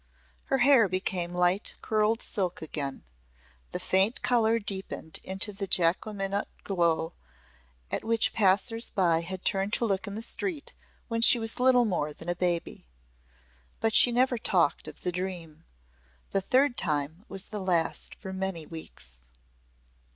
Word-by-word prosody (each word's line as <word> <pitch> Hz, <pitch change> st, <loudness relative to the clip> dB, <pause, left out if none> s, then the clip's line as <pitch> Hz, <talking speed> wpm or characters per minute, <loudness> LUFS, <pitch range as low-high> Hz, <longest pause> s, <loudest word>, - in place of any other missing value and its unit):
Her 270 Hz, -, +1 dB
hair 250 Hz, -5 st, +5 dB
became 185 Hz, -1 st, -1 dB
light 180 Hz, +3 st, +1 dB
curled 215 Hz, +1 st, +1 dB
silk 185 Hz, -3 st, -3 dB
again; 145 Hz, -3 st, -4 dB, 0.7 s
the -, -, -3 dB
faint 190 Hz, +5 st, +2 dB
colour 230 Hz, -2 st, +3 dB
deepened 195 Hz, -6 st, -5 dB
into 195 Hz, +2 st, 0 dB
the 195 Hz, 0 st, -4 dB
Jacqueminot 195 Hz, +3 st, 0 dB, 0.2 s
glow 170 Hz, -3 st, 0 dB, 0.8 s
at -, -, -2 dB
which 225 Hz, 0 st, +2 dB
passers 210 Hz, +3 st, +2 dB
by 170 Hz, -4 st, +2 dB
had 185 Hz, +2 st, -7 dB
turned 195 Hz, +1 st, 0 dB
to 235 Hz, -, +1 dB
look 200 Hz, 0 st, -1 dB
in 200 Hz, -, -5 dB
the 220 Hz, -, -4 dB
street 320 Hz, -, -3 dB, 0.3 s
when 230 Hz, -1 st, -2 dB
she 235 Hz, -, +7 dB
was 225 Hz, 0 st, -4 dB
little 250 Hz, -1 st, +5 dB
more 155 Hz, -8 st, -1 dB
than 165 Hz, +3 st, -8 dB
a 175 Hz, -, 0 dB
baby. 175 Hz, -, -2 dB, 0.9 s
But 225 Hz, -1 st, +1 dB
she 245 Hz, -, +6 dB
never 245 Hz, 0 st, +2 dB
talked 175 Hz, -9 st, +1 dB
of 155 Hz, -, -10 dB
the 180 Hz, -, -1 dB
dream. 175 Hz, -3 st, -6 dB, 0.7 s
The 195 Hz, -, +1 dB
third 255 Hz, +5 st, +2 dB
time 155 Hz, +4 st, -2 dB
was 195 Hz, 0 st, -3 dB
the 210 Hz, -2 st, -6 dB
last 175 Hz, -3 st, -1 dB
for 190 Hz, -2 st, -8 dB
many 190 Hz, -4 st, -3 dB
weeks. 150 Hz, -, -9 dB
190 Hz, 150 wpm, -28 LUFS, 175-225 Hz, 0.9 s, she